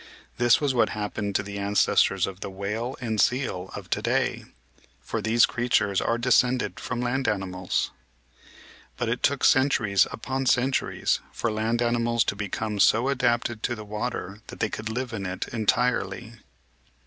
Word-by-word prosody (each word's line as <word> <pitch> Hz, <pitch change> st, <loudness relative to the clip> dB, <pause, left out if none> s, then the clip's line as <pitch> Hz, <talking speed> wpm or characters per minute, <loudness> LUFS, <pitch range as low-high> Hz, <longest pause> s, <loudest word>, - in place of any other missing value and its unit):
This 120 Hz, -1 st, +5 dB
was 145 Hz, -3 st, 0 dB
what 120 Hz, -, +3 dB
happened 105 Hz, -1 st, -3 dB
to 105 Hz, -, +2 dB
the 100 Hz, 0 st, -7 dB
ances 100 Hz, +1 st, +3 dB
tors 95 Hz, -2 st, -1 dB
of 95 Hz, -1 st, -7 dB
the -, -, -5 dB
whale 105 Hz, +7 st, -4 dB
and 110 Hz, -4 st, 0 dB
seal 110 Hz, -8 st, 0 dB
of -, -, -8 dB
to -, -, 0 dB
day, -, -, 0 dB, 0.5 s
for -, -, -4 dB
these 115 Hz, +1 st, +4 dB
creatures 110 Hz, -5 st, +1 dB
are 115 Hz, -, 0 dB
descended 125 Hz, +1 st, +2 dB
from 125 Hz, -1 st, -3 dB
land 125 Hz, +2 st, -1 dB
animals. 95 Hz, -3 st, -1 dB, 1.1 s
But -, -, -1 dB
it -, -, -1 dB
took -, -, +1 dB
centuries 120 Hz, -8 st, +4 dB
upon 130 Hz, +3 st, -3 dB
centuries 130 Hz, +2 st, +1 dB
for 120 Hz, -, -2 dB
land 110 Hz, +2 st, 0 dB
animals 120 Hz, 0 st, +1 dB
to -, -, -2 dB
become 105 Hz, +1 st, -3 dB
so 115 Hz, +6 st, +4 dB
adapted 120 Hz, -4 st, 0 dB
to 120 Hz, -, -1 dB
the 110 Hz, -1 st, -9 dB
water 105 Hz, -1 st, -4 dB
that -, -, -10 dB
they 110 Hz, -, 0 dB
could 110 Hz, +1 st, -5 dB
live 125 Hz, +1 st, -3 dB
in 100 Hz, -3 st, -3 dB
it 90 Hz, +1 st, -4 dB
entirely. 115 Hz, -1 st, 0 dB
115 Hz, 165 wpm, -26 LUFS, 100-120 Hz, 1.1 s, This